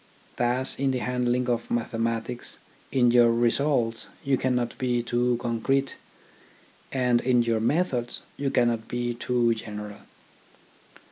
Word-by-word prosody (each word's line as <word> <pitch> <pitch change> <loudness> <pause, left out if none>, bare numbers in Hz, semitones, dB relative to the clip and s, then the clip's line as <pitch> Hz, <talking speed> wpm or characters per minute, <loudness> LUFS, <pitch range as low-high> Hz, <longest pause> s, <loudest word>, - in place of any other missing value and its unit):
Thus 125 +2 0
in 135 0 +2
the 130 - 0
handling 125 0 0
of 120 -1 -1
mathematics 115 +1 -2 0.3
in 120 -2 +4
your 120 -1 +6
results 120 0 +1 0.2
you 140 -1 +2
cannot 125 -2 -1
be 125 -2 0
too 120 0 +1
concrete, 130 +4 0 0.9
and 125 -2 +2
in 125 -2 +3
your 115 -1 +1
methods 125 -1 0
you 140 -1 -1
cannot 120 -3 +1
be 120 0 -2
too 120 0 +1
general. 105 -2 -7
120 Hz, 125 wpm, -26 LUFS, 115-125 Hz, 0.9 s, your